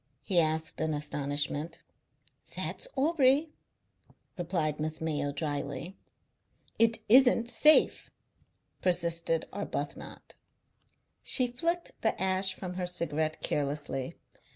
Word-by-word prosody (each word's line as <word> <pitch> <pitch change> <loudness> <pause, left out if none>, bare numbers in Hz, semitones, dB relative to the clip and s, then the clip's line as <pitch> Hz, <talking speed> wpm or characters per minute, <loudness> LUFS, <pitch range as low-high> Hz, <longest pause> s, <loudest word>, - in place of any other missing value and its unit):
he 180 +2 +2
asked 160 -1 0
in 160 -1 -1
astonishment. 145 +2 -2 0.7
"That's - - -3
Aubrey," 290 0 +2 0.8
replied 170 -5 -2
Miss 155 +1 -2
Mayo 145 -3 -2
drily. 145 +3 -4 0.8
"It 230 0 +4
isn't 245 0 +5
safe," 305 +1 +5 0.7
persisted 170 -2 0
Arbuthnot. 145 -8 -6 0.9
She 255 - +4
flicked 335 +8 -2
the 220 - 0
ash 190 0 +2
from 185 -2 -6
her 180 - -2
cigarette 160 -3 -2
carelessly. 140 -2 -2
170 Hz, 95 wpm, -29 LUFS, 150-220 Hz, 0.9 s, isn't